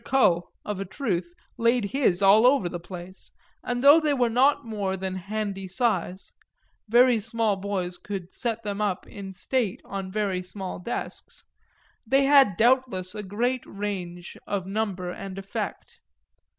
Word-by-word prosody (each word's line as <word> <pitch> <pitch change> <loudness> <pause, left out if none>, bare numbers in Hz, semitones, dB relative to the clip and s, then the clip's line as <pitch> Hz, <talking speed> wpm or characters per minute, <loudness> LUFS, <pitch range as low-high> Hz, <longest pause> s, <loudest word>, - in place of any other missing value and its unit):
Coe, 175 -10 +3 0.2
of 210 -2 -3
a 195 - -3
truth, 185 -5 -2 0.3
laid 235 -1 +3
his 235 -9 +2
all 210 +5 +7
over 260 -8 +3
the 175 0 -5
place, 180 +2 -10 0.3
and 245 0 -2
though 290 +3 +9
they 300 -3 +1
were 245 -3 +2
not 265 +5 +4
of - - -21
more 200 -4 -2
than 190 0 -3
handy 195 0 -4
size 190 -2 -1 0.6
very 240 0 +5
small 225 -1 0
boys 190 -2 -3
could 190 -3 -6
set 230 -2 -2
them 205 0 -3
up 200 -3 -1
in 195 -2 -8
state 205 +2 -1
on 195 -1 -5
very 200 -3 -1
small 185 0 -6
desks 235 +7 -5 0.6
they 270 +4 +3
had 270 -9 +5
doubtless 230 -6 +2
a 210 - -4
great 235 +6 -1
range 185 -4 -5
of 195 -3 -2
number 195 -3 -2
and 195 +1 -7
effect. 325 - -5
205 Hz, 155 wpm, -26 LUFS, 185-240 Hz, 0.6 s, though